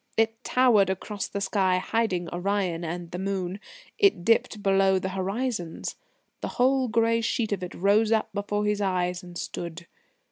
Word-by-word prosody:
It 225 +1 +1
towered 235 -7 +4
across 200 +1 -3
the 200 - -4
sky, 190 -2 +2
hiding 185 -3 0
Orion 180 -2 -1
and 170 +1 -5
the 180 - -4
moon; 190 -1 -2 0.4
it 390 - +3
dipped 220 -2 +2
below 195 -1 +4
the 190 0 -2
horizons. 195 -1 -3 0.5
The - - -2
whole 260 +1 +3
grey 230 0 +2
sheet 225 -1 -1
of 200 -2 -1
it 180 0 -6
rose 205 +4 +3
up 220 -1 +2
before 205 +1 -1
his 210 0 0
eyes 180 -2 0
and 175 -2 -10
stood. 170 -1 -6
195 Hz, 165 wpm, -26 LUFS, 180-225 Hz, 0.5 s, towered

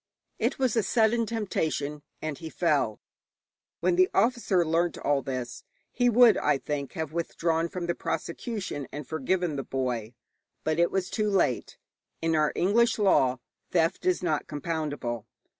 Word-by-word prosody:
It - - 0
was 260 -4 +1
a 225 - +4
sudden 225 +2 +2
temptation, 160 -9 -2 0.2
and 155 -3 -3
he 160 - -6
fell. 150 -11 +1 0.8
When 175 +1 +2
the 185 0 +5
officer 205 -5 +2
learnt 165 +1 +1
all 145 -1 +1
this, 125 -3 -5 0.3
he 245 -1 +2
would, 240 -1 +6
I 150 -2 +2
think, 140 0 -4
have 160 -3 -4
withdrawn 165 0 0
from 180 0 -4
the 170 - 0
prosecution 185 - -4
and 145 -2 -7
forgiven 160 +1 -1
the 135 - -2
boy; 125 -4 -3 0.5
but 155 +1 0
it 170 - +4
was 190 -1 -2
too 215 -2 0
late. 190 - 0 0.4
In 165 0 +1
our 155 -1 +3
English 225 +7 +3
law 130 - +3 0.3
theft 165 0 +1
is 185 0 +2
not 155 -4 0
compoundable. 145 -7 -3
165 Hz, 155 wpm, -28 LUFS, 145-190 Hz, 0.8 s, would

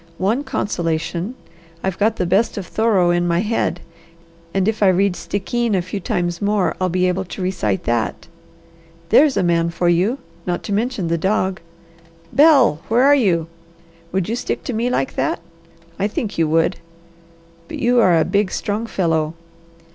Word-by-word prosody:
One 220 +9 0
consolation! 175 - -2 0.5
I've 190 -1 -2
got 220 +2 +2
the 180 - -1
best 200 +6 +1
of 195 - -4
Thoreau 200 -4 +2
in 175 0 +1
my 170 +1 +1
head, 210 -5 -1 0.7
and 195 +1 0
if 220 0 -1
I 200 - +5
read 190 0 +3
Stickeen 220 +4 -2
a 185 - +1
few 185 +3 -5
times 175 -1 -2
more 205 -2 +1
I'll 185 - +1
be 180 +1 +1
able 180 +1 0
to 185 - -8
recite 170 - -1
that. 120 -1 -2 0.8
There's 275 +4 +5
a 195 - +2
man 170 -1 +2
for 170 +1 0
you, 185 +9 +2 0.3
not 175 -1 -2
to 205 - -3
mention 215 -3 -1
the 165 0 0
dog! 190 0 0 0.7
Bel, 275 - +5
where 235 +3 +3
are 285 +1 +6
you? 185 - +2 0.7
Would 190 -2 -1
you 225 - -1
stick - - -3
to 255 - -4
me 230 +3 0
like 135 - -1
that? 135 - 0 0.6
I 200 - +1
think 215 0 -4
you 165 -2 +1
would. 165 +3 +2 0.9
But - - -6
you 245 +1 +2
are 180 -7 +5
a 160 - +2
big, 205 -1 +1
strong 210 +4 -3
fellow. 160 -5 0
190 Hz, 175 wpm, -20 LUFS, 175-220 Hz, 0.9 s, are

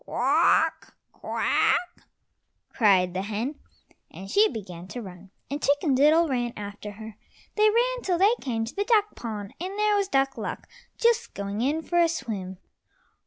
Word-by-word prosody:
"Quawk! - - +1 0.2
Quawk," 355 0 0 0.7
cried 190 -5 +3
the 185 - -2
hen, 220 +8 -4 0.5
and 195 +1 -10
she 430 +2 +5
began 185 -7 -8
to 245 - -7
run, 190 -3 -10 0.2
and 285 +1 -3
Chicken 285 +1 +2
diddle 305 +5 +4
ran 240 -4 -1
after 205 0 -7
her. 220 0 -10 0.4
They 430 0 +5
ran - - +1
till 365 -5 0
they 400 +5 +5
came 225 -4 -2
to 225 - -8
the 405 - 0
duck 425 -2 +2
pond, 210 -4 -6
and 380 +3 -5
there 420 0 +2
was 400 -1 +1
Duck 270 -5 0
luck - - -5 0.3
just 470 0 +1
going 200 +2 -4
in 300 +6 0
for 345 +1 0
a 340 -1 +4
swim. 205 - -5
265 Hz, 165 wpm, -26 LUFS, -, 0.7 s, she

